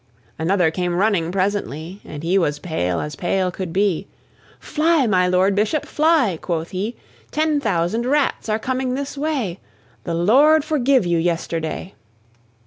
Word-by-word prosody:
Another 175 0 +2
came 175 0 -2
running 185 -4 +1
presently, 190 -2 -2
And 150 0 -8
he 175 +3 +1
was 150 -4 0
pale 90 - -2
as 150 -1 -5
pale 185 +2 0
could 180 -1 -5
be: 195 0 0 0.5
"Fly, 315 -2 +2
my 185 -5 +3
Lord 185 +2 +3
Bishop, 215 +9 0
fly!" 300 - +2
quoth 165 -1 -3
he, 205 +5 -3 0.3
"Ten 305 -1 +1
thousand 205 +1 0
Rats 285 -4 0
are 215 - +2
coming 255 +2 -2
this 280 +1 -4
way; 275 - -2 0.5
The 170 - -2
Lord 280 - +5
forgive 275 - +2
you 170 -1 +1
yesterday!" 165 +1 -2
195 Hz, 145 wpm, -21 LUFS, 170-260 Hz, 0.5 s, Lord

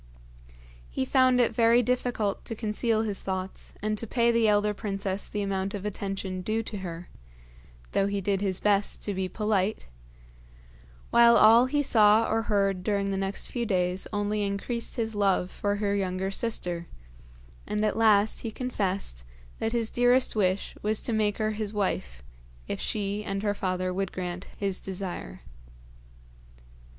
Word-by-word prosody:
He - - -2
found 255 - +4
it 240 - +3
very 235 +1 +4
difficult 240 -4 -1
to 225 - -4
conceal 220 +1 0
his 205 -3 -3
thoughts 190 0 -5
and 215 0 0
to 230 - -5
pay 235 +1 +2
the 230 -1 +3
elder 210 0 +3
princess 195 -2 -3
the 205 -1 -2
amount 195 0 -2
of 200 0 -6
attention 195 -2 -3
due 220 +4 -1
to 210 -2 -6
her, 175 -2 -7 0.8
though 195 - +2
he 200 0 -1
did 195 0 0
his 195 -2 -1
best 205 -1 +1
to 205 - -2
be 190 -1 -2
polite; 210 -1 0 1.3
while 235 0 +7
all 230 +4 +7
he 290 +2 +1
saw 220 -3 +5
or 225 +1 +1
heard 195 -4 0
during 200 -1 0
the - - -1
next 195 +1 -2
few 240 - -2
days 185 -3 0
only 205 0 -1
increased 205 +4 -2
his 225 -3 -2
love 195 -3 +1
for 205 0 -1
her 205 -1 0
younger 190 0 -1
sister, 180 -6 -2 0.8
and 210 0 0
at 215 - 0
last 215 -2 +4
he 230 - -4
confessed 200 - -3 0.4
that 225 - -1
his 230 -2 0
dearest 245 +1 +3
wish 190 -2 0
was 215 +1 0
to 235 - -2
make 210 -2 +1
her 215 -1 0
his 215 -1 -4
wife, 60 - -2 0.4
if - - -4
she 205 0 -2
and 195 -1 -3
her 205 -1 +1
father 185 -2 -2
would 195 0 -2
grant 180 0 -5
his 195 -2 -1
desire. 185 - -6
205 Hz, 160 wpm, -27 LUFS, 195-220 Hz, 1.3 s, while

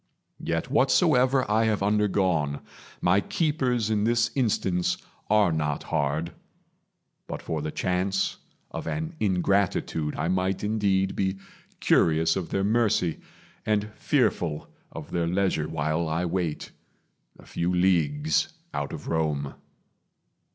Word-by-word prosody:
Yet - - -2
whatsoever 130 +1 +3
I 110 +2 +2
have 105 -3 +1
undergone, 95 -8 +1 0.4
My 90 +3 +4
keepers 125 -9 0
in 105 -1 +1
this 120 +1 +2
instance 95 -8 0 0.3
are 105 -4 +4
not 75 -2 -1
hard. 80 +2 -1 1.0
But - - -5
for 80 -2 -3
the 80 - -3
chance 95 +4 -1 0.3
of - - -6
an 160 +2 -3
ingratitude, 95 -5 0
I - - -1
might 95 +2 0
indeed 100 -3 +1
be 95 0 -1 0.4
curious 80 0 +3
of 95 -3 -3
their 95 - 0
mercy, 105 -5 +1 0.4
And 105 0 0
fearful 100 - 0 0.2
of - - -9
their 85 -1 0
leisure 90 -4 0
while 80 +1 -1
I 80 +3 0
wait, 85 -3 -2 0.7
A - - -16
few 85 +1 -2
leagues 80 -5 +2 0.2
out 70 -1 -3
of - - -7
Rome. 75 -4 -1
95 Hz, 125 wpm, -26 LUFS, 80-105 Hz, 1.0 s, My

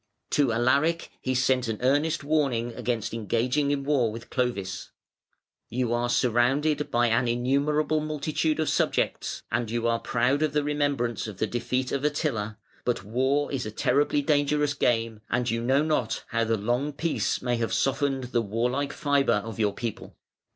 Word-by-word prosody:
To 140 -5 +3
Alaric 140 +8 +1
he 130 0 -1
sent 130 -1 +2
an 110 -1 -2
earnest 145 +5 +2
warning 135 -6 0
against 115 -3 -2
engaging 120 +6 0
in 140 -1 0
war 135 -6 +2
with 115 +2 -9
Clovis: 100 -7 -2 0.8
"You 120 0 -1
are 120 0 0
surrounded 135 +6 +2
by 120 0 +2
an 120 +1 +2
innumerable 140 +6 +1
multitude 155 +1 -1
of 155 - +1
subjects, - - 0
and 120 -3 -1
you 115 +1 -1
are 115 0 +1
proud 125 +6 +1
of 155 -2 +1
the 150 -1 +1
remembrance 145 -7 -1
of 105 -4 -8
the 110 - +1
defeat 125 +3 -2
of 140 0 -1
Attila, 130 -8 -1 0.3
but 125 -5 -1
war 130 +7 0
is 130 -5 -2
a - - -3
terribly 145 +6 +1
dangerous 145 0 +2
game, 115 -5 0
and 120 0 0
you 115 0 -1
know 135 +5 +3
not 150 -8 -1
how 115 0 +1
the 115 0 +1
long 120 +8 -1
peace 165 +3 -1
may 125 -1 0
have 115 -1 -1
softened 135 -1 0
the 120 -1 0
warlike 120 +6 -1
fibre 140 -8 +2
of 115 0 -7
your 105 -2 +1
people". 115 -3 -6
125 Hz, 170 wpm, -26 LUFS, 115-145 Hz, 0.8 s, To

